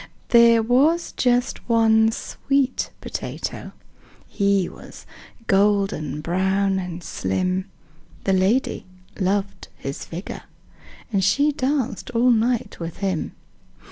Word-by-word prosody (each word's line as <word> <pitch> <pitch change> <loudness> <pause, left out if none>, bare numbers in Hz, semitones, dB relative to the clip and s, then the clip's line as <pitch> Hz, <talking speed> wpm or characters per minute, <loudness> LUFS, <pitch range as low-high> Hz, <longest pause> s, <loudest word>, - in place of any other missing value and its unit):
"There 235 -1 +6
was 285 +9 +2
just 245 0 0
one 225 -1 +4
sweet 270 +3 -1
potato. - - -5 0.6
He 200 -3 +1
was - - -12 0.4
golden 195 -8 +1
brown 190 +3 +1
and 180 -1 -6
slim: 185 - -2 0.5
The 195 - +1
lady 190 +7 +1 0.3
loved 195 +1 -1
his 135 0 -6
figure. 175 +4 -7 0.8
She 275 +11 +3
danced 265 -3 -2
all 245 +2 +4
night 235 +1 0
with 165 -1 -6
him. 190 -5 -2
200 Hz, 100 wpm, -22 LUFS, 185-245 Hz, 0.8 s, There